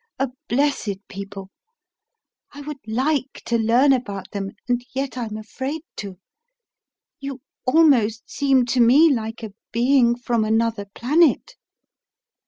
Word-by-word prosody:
A 270 0 0 0.2
blessed 240 -7 -1
people: 195 0 -8 1.0
I 290 - -9
would 290 -1 -7
like 265 +4 0
to 235 -1 +1
learn 240 +5 +4
about 205 -7 -4
them; 195 -1 -4 0.2
and 245 0 0
yet 270 -1 -2
I'm 225 -4 -4
afraid 265 +8 -5
to. 195 -3 -7 1.0
You 275 -1 -6 0.3
almost 255 -7 +3
seem 270 -3 +2
to 250 +1 0
me 275 +7 +6
like 225 -1 -4
a 215 -3 -7 0.2
being 240 0 +3
from 240 -2 0
another 225 -1 0
planet." 300 +6 +2
245 Hz, 125 wpm, -22 LUFS, 220-275 Hz, 1.0 s, me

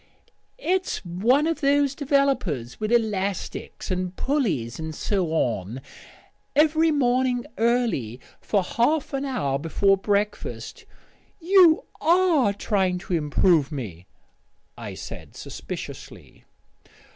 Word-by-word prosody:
"It's 375 - -1
one 225 - +2
of 325 -1 -1
those 280 -1 +3
developers 270 - 0
with 215 +1 -2
elastics 200 -5 -1
and 185 0 -2
pulleys 190 - -1
and 160 -1 -5
so 190 0 -1
on. 120 - -1 0.8
Every 315 +2 +4
morning 255 -3 +1
early, 225 - 0 0.2
for 200 -3 0
half 275 - 0
an 275 +1 -1
hour 140 - -1
before 195 +6 +2
breakfast 205 +2 -2 0.3
" - - -36
"You 350 -5 +7 0.2
are 330 - +4
trying 195 -2 0
to 180 0 -6
improve 155 -1 +2
me," 100 - -7 0.7
I - - -7
said - - -9
suspiciously. - - -9
210 Hz, 110 wpm, -24 LUFS, -, 0.8 s, You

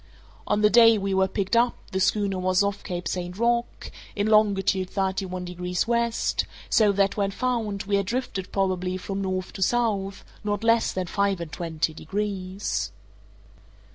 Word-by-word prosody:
On 210 0 +1
the 210 - +6
day 230 -1 +7
we 195 -1 -1
were 190 0 +3
picked 200 +3 -1
up 240 +1 +3 0.2
the 190 - -1
schooner 195 -1 +1
was 185 +1 +2
off 200 0 -2
Cape 180 -2 -4
St. 180 0 -4
Roque, 235 +1 -1 0.2
in 205 - 0
longitude 195 -3 +3
thirty 190 -1 -1
one 180 0 -5
degrees 180 +2 -2
west; 235 -1 +1 0.3
so 215 -2 +5
that, 200 +1 +1
when 200 -1 +1
found, 215 -2 -2
we 200 0 +1
had 200 -1 -1
drifted 235 -5 -3
probably, 185 -1 0
from 195 +1 -4
north 185 -1 -3
to - - -8
south, 200 -3 0 0.2
_not 205 0 -2
less 230 0 +3
than 185 -1 -2
five 200 +1 0
and 170 -2 -6
twenty 160 -1 -2
degrees! 195 - -3
195 Hz, 170 wpm, -25 LUFS, 185-210 Hz, 0.3 s, day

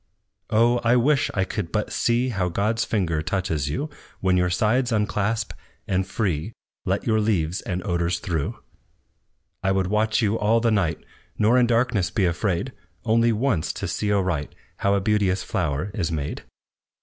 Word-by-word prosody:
"Oh! 120 +2 +3
I 120 +1 +4
wish 135 +3 +3
I 95 - +2
could 85 -3 -4
but 105 -1 -1
see 120 +2 +1
How 95 -6 -1
God's 110 +6 0
finger 85 -9 0
touches 80 -4 -1
you, 145 - -3 0.3
When 95 -1 +2
your 90 0 +2
sides 120 +7 +1
unclasp, 105 0 0 0.3
and 95 -1 0
free, 95 -1 -2 0.3
Let - - -1
your 110 -1 +2
leaves 90 -5 0
and 90 0 -4
odors 85 -2 0
through. 85 -6 -3 1.0
"I 95 - +1
would 95 -1 +1
watch 110 +1 +2
you 110 0 +1
all 110 +2 +3
the 115 0 +2
night, 90 -7 0 0.3
Nor 110 +3 +4
in 120 - +4
darkness 115 -5 +1
be 100 - +1
afraid, 90 +7 -1 0.3
Only 115 +1 +3
once 110 - 0
to - - -4
see 105 - -1
aright 95 -7 0 0.2
How 100 0 +2
a 100 - +1
beauteous 100 -2 +1
flower 75 +8 -2
is 90 -6 -1
made. 75 -3 -4
100 Hz, 165 wpm, -24 LUFS, 90-115 Hz, 1.0 s, I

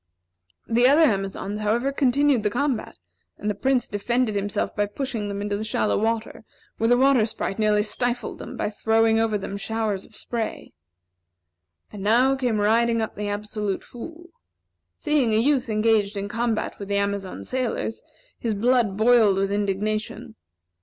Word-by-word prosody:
The 240 +2 +4
other 295 +5 +5
Amazons, 195 -3 -1
however, 230 +6 0
continued 275 -1 +2
the 210 - +1
combat; 260 +1 -2 0.4
and 210 - -2
the - - -2
Prince 255 +4 +1
defended 235 +3 0
himself 205 0 -2
by 205 0 +1
pushing 225 -1 -4
them 200 0 -4
into 205 0 -2
the 215 - -4
shallow 215 -1 0
water, 225 +1 -2 0.4
where 225 - +2
the 245 +1 +4
Water 265 -2 +4
Sprite 215 -2 -3
nearly 210 -1 +3
stifled 245 +2 -2
them - - -8
by 210 - -2
throwing 225 +1 +2
over 225 -2 +1
them 200 0 -5
showers 215 -2 -2
of 220 - -17
spray. 230 0 -5 1.2
And 205 - -7
now 245 +6 +3
came 245 -5 0
riding 230 +2 +3
up 220 - -2
the 205 0 -3
Absolute 205 -1 -3
Fool. 335 +8 -10 0.7
Seeing 285 -8 +1
a - - +4
youth 260 +1 +2
engaged 215 -1 +2
in 200 0 -3
combat 230 +1 -2
with 200 - -6
the 200 0 0
Amazon 200 -2 -2
sailors, 250 -3 -2 0.4
his 225 -3 -1
blood 230 -2 +2
boiled 220 -3 +5
with 195 0 0
indignation. 215 +3 -2
220 Hz, 160 wpm, -24 LUFS, 205-245 Hz, 1.2 s, other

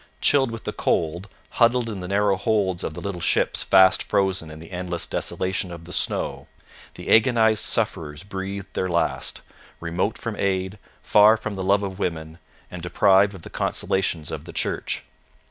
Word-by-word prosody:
Chilled 135 -3 +3
with 115 -1 -7
the - - -4
cold, 85 +4 -1 0.3
huddled 120 0 +4
in 105 -4 -5
the 90 - -6
narrow 100 +1 +2
holds 95 -2 0
of 80 - -4
the - - -7
little 100 -3 -5
ships - - +1
fast 95 -1 +5
frozen 95 -4 0
in 75 - -10
the 80 +3 -12
endless 90 -1 -2
desolation 95 -1 -2
of 85 -1 -9
the 90 - -8
snow, - - -1 0.5
the - - -5
agonized 110 -2 +4
sufferers 75 -1 -2
breathed 100 0 -6
their 95 - -1
last, 85 -1 -1 0.4
remote 85 +5 -2
from 115 -2 -5
aid, 95 +1 -1 0.2
far 105 +2 +6
from 110 -1 -5
the 95 - -5
love 100 +2 +2
of 95 0 -5
women, 80 -3 -4 0.3
and 90 - -7
deprived 100 +3 +3
of 85 - -12
the - - -9
consolations 85 -5 -1
of - - -6
the - - -10
Church. - - -2
95 Hz, 175 wpm, -23 LUFS, 90-105 Hz, 0.5 s, far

